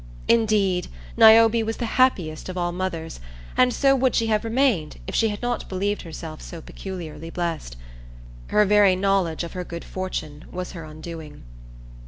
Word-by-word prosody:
Indeed, 210 -5 +2 0.3
Niobe 225 +1 +7
was 225 0 -3
the 240 - -2
happiest 190 -11 +1
of 185 - -5
all 175 -1 0
mothers, 175 - -4 0.4
and 255 0 +4
so 275 +2 +3
would 260 -1 +2
she 230 - +2
have 215 -1 +1
remained 225 - +1
if - - -6
she 225 - +2
had 205 +2 -6
not 245 0 -2
believed 200 +2 -1
herself 160 -1 -8
so 170 - -8
peculiarly 165 -2 -8
blessed. 165 - -4 0.7
Her 210 - +4
very 205 -2 +5
knowledge 185 -4 +1
of 170 - -7
her 180 - -4
good 170 -1 -7
fortune 160 -5 -5
was 180 0 -5
her 165 -4 -8
undoing. 155 - -9
185 Hz, 165 wpm, -24 LUFS, 165-220 Hz, 0.7 s, Niobe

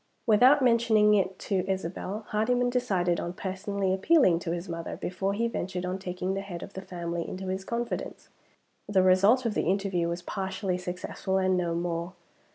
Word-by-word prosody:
Without 250 +6 +6
mentioning 230 -3 +4
it 190 -2 +1
to 190 -2 -1
Isabel, 190 +3 -3
Hardyman 245 +3 +1
decided 190 -9 +1
on 175 - -4
personally 190 +1 -2
appealing 190 - +4
to 170 - -5
his 175 +2 -4
mother 165 -1 -5
before 190 +2 -2
he 230 +2 +1
ventured 180 -5 -3
on 185 +1 -3
taking 185 0 -3
the 195 - -2
head 185 -3 -7
of - - -10
the 190 - -6
family 170 -2 -4
into 185 0 -5
his 190 +1 -3
confidence. 235 +3 -4 0.6
The 190 -3 +4
result 195 +7 +5
of 230 - 0
the - - +1
interview 190 -3 0
was 170 +1 -4
partially 190 -1 -3
successful 180 +1 -3
and 185 -1 +2
no 175 -2 0
more. 170 +1 -2
190 Hz, 175 wpm, -28 LUFS, 180-210 Hz, 0.6 s, Without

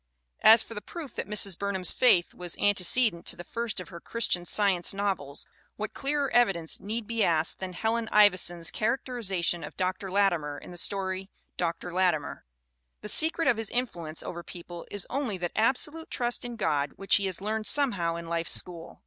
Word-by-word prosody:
As 220 +1 +7
for - - -11
the 210 - -6
proof 320 0 -9
that - - -5
Mrs. 200 -3 +4
Burnham's 195 -3 -1
faith 185 -9 +3
was 175 -1 -4
an 205 0 +2
tecedent 195 -1 +1
to - - -2
the 175 - -9
first 230 +3 -4
of 180 - -8
her 170 -2 -9
Christian 180 -4 0
Science 195 -2 +4
novels 190 -9 -3 0.3
what 215 0 -5
clearer 280 0 -2
evidence 195 -9 +2
need 220 +3 -4
be 230 0 -1
asked 160 -2 +1
than 185 -1 -6
Helen 225 +3 -1
Ivi 205 -3 +6
son's 175 -2 0
characterization 215 -8 -1
of - - -9
Dr. 185 +1 -2
Latimer 175 -7 +1
in - - -11
the 175 - -10
story, 190 0 -2 0.3
Dr. 170 0 -3
Larimer? 175 -5 0 0.6
"The 210 - -6
secret 325 +6 +6
of 245 - +3
his 225 -2 -3
influence 170 -11 -4
over 175 -1 -6
people 175 0 -10
is 205 -2 -2
only 255 -7 -3
that 175 -1 -3
absolute 280 +8 0
trust 240 -1 -1
in 240 -1 -6
God 145 -9 -1
which 195 - +3
he 200 -1 -1
has 185 - -3
learned 215 +2 -3
somehow 200 -13 +2
in 170 0 -7
life's 170 0 -1
school. 170 -2 -6
195 Hz, 190 wpm, -28 LUFS, 175-230 Hz, 0.6 s, As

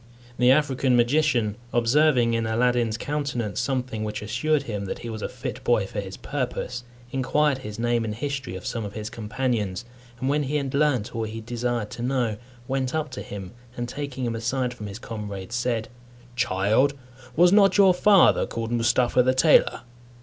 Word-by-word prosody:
The 125 0 +5
African 135 -2 +3
magician, 120 -4 +2
observing 120 0 +3
in 115 -1 0
Aladdin's 120 -1 +1
countenance 140 -7 -2
something 125 -5 -2
which 105 0 -4
assured 140 +7 0
him 105 -6 -4
that - - -4
he 115 - -4
was 110 -1 -6
a - - -3
fit - - -6
boy 115 -5 +2
for 95 - -5
his 95 -1 -6
purpose, 125 -2 -4 0.3
inquired 135 +2 +1
his 105 -5 -7
name 120 0 +1
and 110 -1 -3
history 135 -6 -4
of 95 - -8
some 115 - -3
of 100 0 -6
his 110 0 -6
companions, 110 -2 -2 0.3
and 130 - -2
when 145 +2 +2
he 145 +1 -2
had 140 -3 -1
learnt 140 -8 +1
all 115 -1 -1
he 110 +1 -6
desired 120 -1 -3
to - - -7
know, 120 -4 0 0.3
went 130 +1 -1
up 155 -3 -2
to - - -6
him, 95 -3 -7 0.3
and 120 0 -3
taking 135 -1 -4
him 115 -1 -2
aside 125 +2 -1
from 105 -4 -8
his 100 - -7
comrades, 105 -4 -7
said, 120 -2 -1 0.5
"Child, 120 +4 +2 0.4
was 175 +2 +6
not 200 -1 +5
your 195 -2 +7
father 195 +1 +5
called 115 0 -4
Mustapha 120 +2 +3
the 130 +1 +2
tailor?" 155 +3 +4
120 Hz, 180 wpm, -25 LUFS, 110-135 Hz, 0.5 s, your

